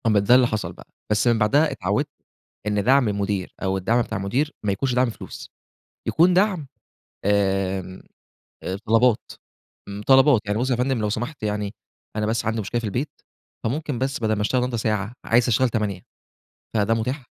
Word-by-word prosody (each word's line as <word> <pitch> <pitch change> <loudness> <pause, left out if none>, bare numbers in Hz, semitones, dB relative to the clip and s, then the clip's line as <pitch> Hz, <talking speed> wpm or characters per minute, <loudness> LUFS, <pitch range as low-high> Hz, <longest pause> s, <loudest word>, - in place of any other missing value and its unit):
ما 105 -2 +4
ده 100 +5 +5
اللي 125 -1 +5
حصَل 105 -7 -3
بقى، - - -15 0.2
بس 105 +3 +2
من 120 -1 +4
بَعدها 145 +9 +3
اتعوّدت 105 +10 -1 0.6
إن 105 -1 +1
دعْم 130 +1 +4
المدير 100 -2 -2
أو 95 0 0
الدعم 115 +6 +2
بتاع 115 - -3
المدير 125 +11 -1
ما 100 - +2
يكونش 125 +6 -1
دعْم 125 +1 +3
الفلوس، 115 - -8 0.6
يكون 175 +3 +4
دعْم 185 -5 +2 0.6
آمم، 95 -2 0 0.6
آآ، 95 - -3
طلبات، 115 +1 +3 0.6
م 100 +1 -6
طلبات، 135 0 +5
يعني 105 +1 -1
بُصّ 130 +2 0
يا - - +3
فندم 125 +1 0
لو 105 -1 0
سمحت 120 +6 -4
يعني، 105 -1 -2 0.4
أنا 105 -1 0
بس 110 +2 -1
عَندي 110 0 0
مشكلة 120 +4 -2
في - - -5
البيت 125 +9 -2 0.5
فممكن 140 +1 -2
بس 135 +1 -1
بدَل 110 -2 +1
ما 105 - -2
اشتغل 125 +5 +1
النهارده 125 -1 -1
ساعة 105 -1 -1
عايز 120 +2 +3
أشتغل 125 +2 +3
8 105 -5 -2 0.7
فده 110 +1 +2
مُتاح، 125 +5 -2
110 Hz, 180 wpm, -23 LUFS, 105-125 Hz, 0.7 s, ده